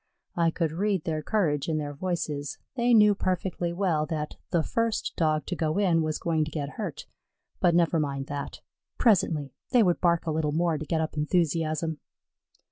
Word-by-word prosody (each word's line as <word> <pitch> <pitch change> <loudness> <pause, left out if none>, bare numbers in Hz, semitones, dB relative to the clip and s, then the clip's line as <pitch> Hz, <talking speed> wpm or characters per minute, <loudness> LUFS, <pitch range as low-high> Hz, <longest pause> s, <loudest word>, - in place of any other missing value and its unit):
I 170 -1 +3
could 165 -1 -1
read 190 +1 0
their 155 -2 -2
courage 155 -6 0
in 160 - 0
their 145 -1 -3
voices. 150 -3 -3 0.2
They 245 -1 +2
knew 210 -1 +7
perfectly 185 -2 -1
well 170 -4 0
that 150 -1 -3
the 170 -3 +1
first 230 +3 -1
Dog 155 -2 +1
to 180 - -3
go 160 0 -1
in 180 -5 +3
was 155 -1 -1
going 160 -2 0
to 155 - -4
get 145 -2 -4
hurt, 185 -3 -6 0.5
but 175 -1 +3
never 170 -1 +3
mind 140 -2 -2
that 140 0 -6 0.4
presently; 160 - +2 0.2
they 245 -3 +5
would 175 -3 +1
bark 170 -2 +2
a 160 - 0
little 155 -1 0
more 165 -1 +1
to 155 - -6
get 160 -1 0
up 155 - -3
enthusiasm. 160 0 0
165 Hz, 185 wpm, -27 LUFS, 155-180 Hz, 0.5 s, knew